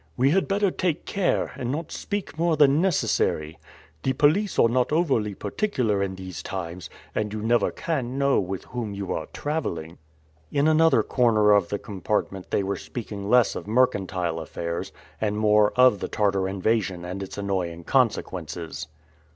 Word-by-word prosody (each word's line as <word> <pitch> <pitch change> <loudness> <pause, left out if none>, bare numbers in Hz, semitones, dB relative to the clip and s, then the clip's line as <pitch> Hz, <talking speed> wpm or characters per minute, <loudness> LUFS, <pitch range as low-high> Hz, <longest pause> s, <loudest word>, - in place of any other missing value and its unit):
"We 135 +3 +4
had 195 +4 +2
better 200 -1 +1
take 175 -4 -1
care, 195 -3 0
and 125 -1 -2
not 160 +3 -4
speak 205 -4 -4
more 165 0 +1
than 145 +1 +5
necessary. 80 - 0 0.4
The 130 - 0
police 160 +10 +2
are - - +6
not 125 +3 +1
over 150 -8 +2
particular 110 - -1
in 95 -1 -2
these 95 -5 -7
times, 90 -4 -6 0.2
and 105 -1 -1
you 105 0 -4
never 115 -1 +3
can 135 -6 -3
know 140 0 +3
with 95 0 -3
whom 115 -5 -5
you 100 -2 -3
are - - -4
traveling." 85 - -4 0.5
In 140 +2 +2
another 160 +1 +4
corner 110 -4 +3
of 100 -4 +4
the 100 - -1
compartment 100 -1 -3
they 100 - +1
were 100 +1 -2
speaking 105 -4 -6
less 125 -2 +4
of - - -6
mercantile 95 -8 +1
affairs, 85 +1 -4 0.3
and 105 -1 0
more 105 -1 +4
of 125 -5 +5
the - - -3
Tartar 100 -2 +1
invasion 95 -2 -1
and 90 +2 -5
its 95 - -7
annoying 90 -4 -2
consequences. 90 - -1
105 Hz, 165 wpm, -25 LUFS, 95-140 Hz, 0.5 s, are